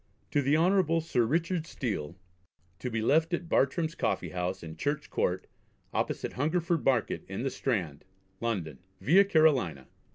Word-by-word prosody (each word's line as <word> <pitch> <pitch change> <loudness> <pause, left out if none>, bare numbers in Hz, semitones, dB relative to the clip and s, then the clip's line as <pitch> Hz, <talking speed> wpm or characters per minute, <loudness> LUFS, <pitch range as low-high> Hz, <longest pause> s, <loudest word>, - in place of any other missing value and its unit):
"To 145 - +2
the 140 +3 +3
Hon. 170 -1 +3
Sir 140 -7 +1
Richard 165 +3 0
Steele; 90 - -3 0.6
to 125 - -3
be 115 -2 -2
left 160 +7 +3
at 170 0 -7
Bartram's 160 +2 +1
Coffee - - -1
House 90 0 -3
in 80 -1 -7
Church 145 +1 -2
Court, 90 +1 0 0.5
opposite - - -2
Hungerford 165 +3 0
Market 135 - +1
in 95 +5 -4
the 135 - -1
Strand, 90 - -2 0.4
London. 95 - -3 0.2
Via 185 +8 +6
Carolina. 145 - +2
140 Hz, 150 wpm, -29 LUFS, -, 0.6 s, Via